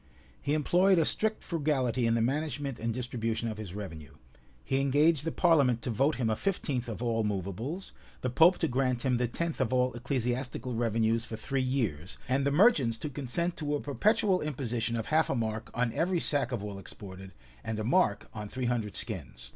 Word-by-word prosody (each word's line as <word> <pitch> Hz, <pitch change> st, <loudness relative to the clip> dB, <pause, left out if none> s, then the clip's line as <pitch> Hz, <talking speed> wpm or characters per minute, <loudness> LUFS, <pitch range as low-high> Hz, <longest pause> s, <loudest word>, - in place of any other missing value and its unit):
He 145 Hz, +1 st, 0 dB
employed 180 Hz, +5 st, +4 dB
a 165 Hz, -, +4 dB
strict 220 Hz, +6 st, +1 dB
frugality 130 Hz, -7 st, 0 dB
in 115 Hz, -, +2 dB
the 115 Hz, -, +2 dB
management 145 Hz, 0 st, -2 dB
and 115 Hz, +1 st, -1 dB
distribution 115 Hz, -1 st, -2 dB
of 110 Hz, -1 st, -4 dB
his 100 Hz, -4 st, -7 dB
revenue: 80 Hz, -8 st, -8 dB, 0.5 s
he 135 Hz, 0 st, 0 dB
engaged 145 Hz, +2 st, +3 dB
the 165 Hz, -, 0 dB
parliament 140 Hz, -10 st, +3 dB
to 125 Hz, -, -1 dB
vote 135 Hz, +8 st, +2 dB
him 125 Hz, -3 st, -1 dB
a 110 Hz, -, +1 dB
fifteenth 140 Hz, -, -2 dB
of 115 Hz, +1 st, -5 dB
all 115 Hz, -2 st, +1 dB
movables; 105 Hz, -, -3 dB, 0.3 s
the 130 Hz, -, -1 dB
pope 165 Hz, +8 st, +6 dB
to 165 Hz, -, 0 dB
grant 125 Hz, -2 st, 0 dB
him 125 Hz, -2 st, +2 dB
the 125 Hz, 0 st, +1 dB
tenth 165 Hz, +5 st, -3 dB
of 125 Hz, -2 st, 0 dB
all 125 Hz, 0 st, +2 dB
ecclesiastical 125 Hz, 0 st, -2 dB
revenues 115 Hz, 0 st, +1 dB
for 110 Hz, -, -6 dB
three 135 Hz, +4 st, -2 dB
years; 110 Hz, -, -2 dB
and 135 Hz, +2 st, +1 dB
the -, -, +2 dB
merchants 145 Hz, -, +4 dB
to 145 Hz, +6 st, -5 dB
consent 145 Hz, +6 st, -2 dB
to 150 Hz, -1 st, -1 dB
a -, -, -1 dB
perpetual 190 Hz, +6 st, +2 dB
imposition 120 Hz, -6 st, -2 dB
of 115 Hz, -1 st, -2 dB
half 160 Hz, +1 st, +2 dB
a -, -, +1 dB
mark 110 Hz, -1 st, -2 dB
on 120 Hz, -1 st, 0 dB
every 175 Hz, +1 st, +1 dB
sack 140 Hz, -5 st, +2 dB
of 115 Hz, -5 st, -3 dB
wool 100 Hz, -2 st, -5 dB
exported, 95 Hz, -1 st, -9 dB, 0.3 s
and 110 Hz, -1 st, -3 dB
a 110 Hz, -, -2 dB
mark 110 Hz, -, +2 dB
on 105 Hz, -1 st, -6 dB
three 130 Hz, +2 st, -3 dB
hundred 115 Hz, -5 st, -1 dB
skins. 65 Hz, 0 st, -4 dB
125 Hz, 200 wpm, -30 LUFS, 115-145 Hz, 0.5 s, pope